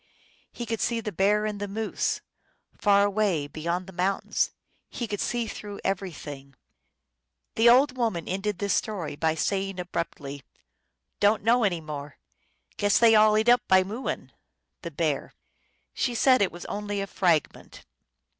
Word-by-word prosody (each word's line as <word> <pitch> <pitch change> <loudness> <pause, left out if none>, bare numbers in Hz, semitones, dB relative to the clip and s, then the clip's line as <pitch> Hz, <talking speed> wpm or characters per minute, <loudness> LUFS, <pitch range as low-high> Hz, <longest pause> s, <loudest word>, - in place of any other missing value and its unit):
He 240 - -6
could 225 0 -3
see 235 -1 0
the 215 -2 -4
bear 205 +3 +2
and 210 -1 -3
the 205 - -3
moose 215 +2 -2 0.5
Far 200 -1 +4
away 200 -7 +1
beyond 170 +5 -3
the 190 - -12
mountains; 190 +2 0 0.4
He 240 - -4
could 205 -2 -4
see 240 -1 -1
through 205 -2 -7
everything." 150 -8 -5 1.0
The 230 +1 +5
old 265 +4 +6
Indian 255 - -13
woman 195 -8 -1
ended 195 +1 -2
this 200 -1 0
story 185 -9 -2
by 160 +1 0
saying 195 +3 -1
abruptly, 145 -5 -5 0.4
" - - -53
Don 210 +1 +3
t - - -18
know 235 +1 +4
any 175 -5 +1
more. 145 -2 -7 0.6
Guess 205 0 +3
they 230 -1 +6
all 215 0 +6
eat 220 +2 +1
up 245 +1 +6
by 190 0 +5
muoin 215 +7 -5 0.3
" - - -55
(the - - -5
bear). - - -2 0.6
She 245 - -1
said 255 +2 +5
that 200 - +4
it - - -6
was 175 +1 -9
only 205 0 -3
a 195 - -1
fragment. 175 -6 -1
200 Hz, 170 wpm, -26 LUFS, 175-215 Hz, 1.0 s, old